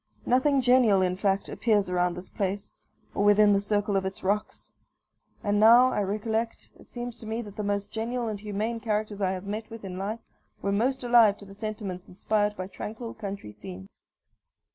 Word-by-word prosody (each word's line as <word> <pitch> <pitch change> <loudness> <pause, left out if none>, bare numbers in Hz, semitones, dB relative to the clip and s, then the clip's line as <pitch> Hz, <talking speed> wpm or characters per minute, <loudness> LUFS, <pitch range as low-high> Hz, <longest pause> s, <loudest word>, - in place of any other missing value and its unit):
Nothing 265 +2 +3
genial, 245 -6 +5
in 180 0 +1
fact, 195 0 0
appears 210 -4 +1
around 180 -1 +1
this 180 - -8
place, 200 -1 -3 0.4
or 200 - 0
within 205 0 +6
the 200 - +2
circle 205 0 0
of 195 - +2
its 190 0 -5
rocks. 205 +2 -2 0.7
And, 205 0 +1
now 240 +4 +7
I - - 0
recollect, 220 +3 -2
it - - -17
seems 240 -1 -6
to 220 - -8
me 225 +2 -2
that 205 -2 -11
the - - -3
most 205 0 -2
genial 235 +2 -2
and 215 -2 -3
humane 215 +2 -2
characters 210 -2 -2
I 190 -1 +1
have 185 +1 -6
met 215 +2 -5
with 225 -3 -9
in 185 -1 -6
life 215 +4 -3 0.4
were 200 - -1
most 255 +6 0
alive 235 -4 +5
to 200 - -12
the 195 - -12
sentiments 205 -3 -5
inspired 205 +2 0
by 185 - -3
tranquil 220 +4 -7
country 200 - -6
scenes. 95 -2 -11
210 Hz, 190 wpm, -27 LUFS, 195-225 Hz, 0.7 s, now